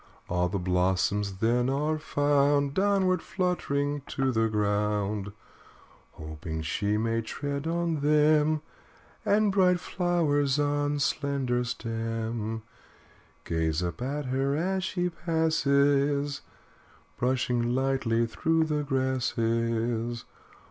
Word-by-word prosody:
All 90 0 0
the 100 - -2
blossoms 95 +2 +1
then 120 +2 +2
are 150 +3 0
found 145 -1 +2
Downward 190 -1 +2
fluttering 145 -6 -1
to 135 -1 0
the 115 -1 +2
ground, 105 -1 -1 0.8
Hoping 80 +1 -6
she 100 +6 0
may 115 +1 0
tread 140 +5 -4
on 170 -1 0
them. 150 +1 +3 0.6
And 210 0 +3
bright 180 -2 +3
flowers 155 -7 +1
on 145 0 0
slender 140 -3 0
stem 115 -2 -3 0.8
Gaze 80 0 0
up 85 +2 -4
at 140 +3 -3
her 135 +2 0
as 185 +4 -1
she 180 -1 -1
passes 145 -4 +1 0.8
Brushing 125 -1 0
lightly 130 -3 +1
through 160 +9 +1
the 150 -1 -1
grasses. 120 -3 -1
135 Hz, 100 wpm, -28 LUFS, 115-150 Hz, 0.8 s, them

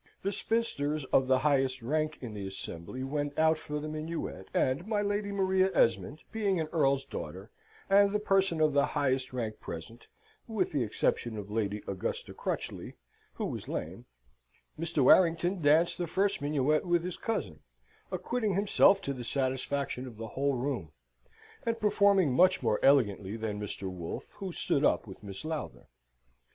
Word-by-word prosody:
The 200 - 0
spinsters 155 -10 -1
of 130 - +5
the 130 0 +4
highest 135 -3 +1
rank 155 +4 0
in 120 -4 -6
the 100 -2 -5
assembly 95 +5 -6
went 145 +1 -2
out 160 0 +4
for 150 -1 -4
the 150 - -5
minuet, 155 - -5
and 140 +9 0
my 210 -2 +1
Lady 205 0 -1
Maria 190 -1 +2
Esmond, 115 +8 +2
being 205 -5 0
an 160 - 0
earl's 140 -4 +2
daughter, - - -7 0.4
and 200 0 +5
the 210 - +2
person 195 -5 +2
of 155 -2 +4
the 140 0 +4
highest 130 -2 +1
rank 115 -4 -4
present 85 +9 -8 0.4
(with 215 -6 -1
the 145 -4 0
exception 110 0 0
of 105 0 -7
Lady 105 -1 -1
Augusta 95 -1 -4
Crutchley, - - -4 0.4
who - - -3
was - - -5
lame), - - -5 0.7
Mr. 165 -3 0
Warrington 175 +4 +4
danced 155 +5 +4
the 175 - -1
first 195 +2 0
minuet 145 +1 +1
with 175 -2 +1
his 180 -1 -4
cousin, 205 - -3 0.5
acquitting 205 +3 -1
himself 200 0 +4
to 140 - -2
the 125 -2 -6
satisfaction 130 0 -2
of 115 -4 -10
the 115 0 -6
whole 140 +4 0
room, 120 - -3 0.7
and 230 0 -1
performing 200 - +4
much 185 +3 +4
more 110 -3 +2
elegantly 105 -7 +3
than 105 -2 -3
Mr. 100 -1 -5
Wolfe, 90 -3 -6
who 195 -2 -5
stood 150 -3 0
up - - +3
with 95 0 -11
Miss 100 +4 -8
Lowther. 155 -1 -5
145 Hz, 165 wpm, -30 LUFS, 120-185 Hz, 0.7 s, of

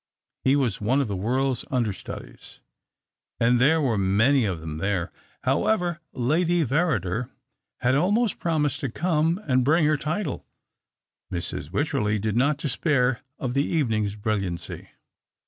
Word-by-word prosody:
He 135 +1 +4
was 125 -9 0
one 125 +7 +2
of 140 - +1
the 100 - -3
world's 130 +6 0
understudies, 120 -6 -4 0.8
and 120 +1 +3
there 160 +5 +5
were 120 -8 +1
many 110 +7 +3
of 90 -5 -2
them 80 -1 -6
there. 95 -1 -1 0.3
However, 170 +5 +1
Lady 165 +6 +1
Verrider 125 - 0 0.5
had 125 +1 +3
almost 205 - +2
promised 150 -4 0
to 140 -5 -2
come 165 - +1
and 130 -2 +3
bring 155 +4 +3
her 150 0 +3
title. 155 +2 -3 0.9
Mrs. 85 -4 -3
Wycherley 110 -3 0
did 105 0 -2
not 140 +4 +2
despair 130 -3 +1 0.2
of 125 -2 -3
the 140 +1 +2
evening's 110 -11 0
brilliancy. 100 -5 -3
130 Hz, 135 wpm, -25 LUFS, 105-150 Hz, 0.9 s, there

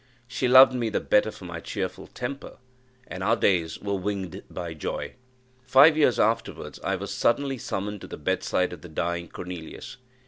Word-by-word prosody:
She 125 +1 -1
loved 130 +1 +8
me 120 -3 -1
the - - 0
better 105 +1 +3
for 95 - -11
my 85 -1 -6
cheerful 95 0 -5
temper, 135 +3 -6 0.5
and 95 - -7
our - - +3
days 85 -4 +1
were 100 0 -3
winged 95 -3 -3
by 85 -2 -5
joy. 80 - -4 0.5
Five 135 +5 +6
years 145 -6 +3
afterwards 110 +2 -1
I - - 0
was - - -5
suddenly 135 +1 +1
summoned 105 -1 -4
to - - -8
the - - -8
bedside 90 -1 0
of - - -10
the 90 - -11
dying 85 +2 -2
Cornelius. 90 +5 -8
100 Hz, 175 wpm, -26 LUFS, 90-125 Hz, 0.5 s, loved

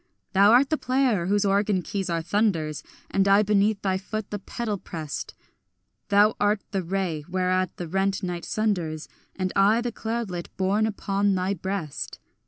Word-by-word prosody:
Thou 200 +2 +6
art 265 +4 +5
the 310 - +1
player 255 -9 +1
whose 205 +1 +2
organ 200 -1 +2
keys 195 +3 -3
are 165 -1 -1
thunders, 170 -6 0 0.3
And 195 0 +2
I 200 +1 +6
beneath 210 0 +2
thy 190 -1 +1
foot 215 +2 -5
the 205 - -3
pedal 210 0 -4
prest; 155 -5 -6 0.7
Thou 205 +2 +5
art 205 0 +2
the 195 -2 0
ray 175 -4 -2
whereat 185 0 0
the 175 - -5
rent 195 +3 0
night 175 -2 -3
sunders, 175 -8 -1 0.3
And 185 -1 -2
I 205 +4 +5
the 240 0 -2
cloudlet 220 -6 -4
borne 200 +3 +2
upon 200 -1 0
thy 185 +1 0
breast. 190 -5 -4
195 Hz, 165 wpm, -25 LUFS, 185-210 Hz, 0.7 s, Thou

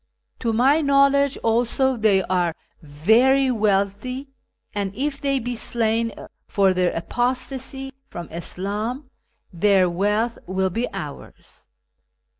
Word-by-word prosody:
To 230 - 0
my 265 +7 +4
knowledge, 280 -1 +3
also, 240 +3 +2
they 210 -4 +3
are 175 -3 0 0.3
very 225 - +3
wealthy, 215 +5 0 0.4
and 200 -1 -3
if 280 +3 -2
they 275 -1 +1
be 245 -1 -3
slain 230 0 0 0.4
for 195 -3 +3
their 180 -1 +1
apostacy 260 +6 -3
from 175 -8 -7
Islam, 210 - -4 0.4
their 190 +1 +4
wealth 210 +6 0
will 190 0 0
be 230 +7 -2
ours.' - - -9
225 Hz, 110 wpm, -22 LUFS, 195-265 Hz, 0.4 s, my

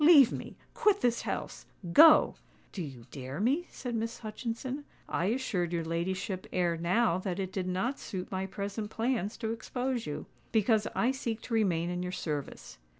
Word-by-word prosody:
"Leave 295 -6 +8
me—quit 420 -3 -1
this 240 -1 +2
house—go——" 300 - +4 0.4
"Do 190 - -5
you 135 -7 -7
dare 135 +1 -6
me?" 280 - +2
said 245 -2 -5
Miss 230 +1 -2
Hutchinson. 235 +5 -4 0.2
"I 175 - 0
assured 195 -6 0
your 170 -2 -1
ladyship 185 +3 -2
ere 175 -2 +1
now 175 +2 +2
that 185 -2 -3
it 190 -1 -3
did 185 -2 -2
not 190 +9 -1
suit 185 -2 -5
my 190 0 -2
present 200 +2 -4
plans 225 -2 -1
to 225 -2 -2
expose 245 +1 -2
you; 150 - -4 0.3
because 220 -1 +3
I 245 - +3
seek 235 -4 -3
to 235 - -6
remain 175 -6 +2
in 180 0 -2
your 180 0 -3
service. 145 - -5
205 Hz, 165 wpm, -31 LUFS, 180-240 Hz, 0.4 s, Leave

